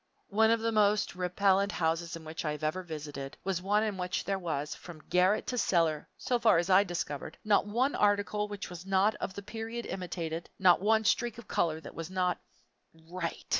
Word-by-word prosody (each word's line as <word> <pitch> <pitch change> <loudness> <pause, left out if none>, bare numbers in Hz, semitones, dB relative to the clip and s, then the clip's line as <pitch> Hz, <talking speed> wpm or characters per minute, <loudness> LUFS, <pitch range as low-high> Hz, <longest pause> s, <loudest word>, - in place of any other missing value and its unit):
One 220 +2 +4
of 230 0 +3
the 230 0 +1
most 210 -1 +3
repellent 195 +2 +2
houses 165 +1 -1
in 165 -1 -10
which 160 +1 -5
I 150 -2 -1
have 150 - -8
ever 155 +5 0
visited 145 -5 -7
was 190 -2 -1
one 205 +3 +2
in 210 -3 -2
which 180 0 -2
there 195 -1 -1
was, 150 -5 -3
from 165 -4 -11
garret 185 +3 +3
to 250 - -2
cellar, 165 -6 +1
so 245 -1 0
far 225 -6 +5
as 175 +3 +1
I 190 +2 +7
discovered, 170 -6 -4
not 210 -1 +3
one 250 +7 +1
article 205 0 +1
which 205 -1 -6
was 175 -1 -8
not 195 +2 +3
of 190 - -3
the 200 - -6
period 225 +3 -5
imitated, 170 -3 -4
not 180 -2 +5
one 220 +2 +3
streak 235 0 +1
of 235 - -11
color 165 -2 +1
which - - -10
was 165 0 -6
not 180 -2 0 0.7
"right." 180 -2 -4
185 Hz, 205 wpm, -30 LUFS, 170-210 Hz, 0.7 s, I